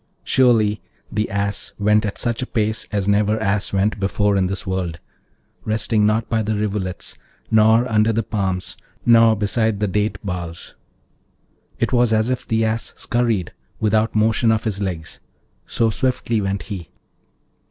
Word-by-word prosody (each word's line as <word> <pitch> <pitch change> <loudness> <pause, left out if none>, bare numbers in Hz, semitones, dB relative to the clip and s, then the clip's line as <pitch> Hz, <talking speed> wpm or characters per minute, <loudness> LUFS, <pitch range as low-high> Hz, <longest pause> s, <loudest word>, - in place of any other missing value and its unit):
Surely, 110 -5 +3 0.3
the 105 +1 -1
Ass 100 0 -2
went 105 +1 +2
at 100 - -5
such 120 -1 -1
a 130 - -3
pace 110 -1 -1
as 100 -2 -1
never 105 +1 +2
Ass 105 -1 0
went 100 +2 0
before 100 +1 +1
in 95 -1 +2
this 95 +1 -4
world, 95 -3 -2 0.7
resting 110 0 +1
not 110 +1 +1
by 110 -1 0
the 110 0 -1
rivulets, 100 -3 -3 0.3
nor 110 +2 +5
under 110 -1 +2
the 115 +1 0
palms, 95 -4 -2 0.3
nor 115 -1 +6
beside 110 +1 0
the 105 - +1
date 105 +1 -1
boughs; 85 -3 -5 1.0
it - - -1
was 120 -2 +3
as 110 +3 +2
if 130 - -3
the 110 0 +1
Ass 110 +1 -2
scurried 115 -7 -1 0.3
without 110 +1 +1
motion 110 +1 +3
of 110 -1 0
his 105 -2 -2
legs, 85 -5 -4 0.5
so 115 -1 +1
swiftly 120 -2 -1
went 95 -1 -2
he. 90 -7 -7
105 Hz, 155 wpm, -21 LUFS, 100-110 Hz, 1.0 s, nor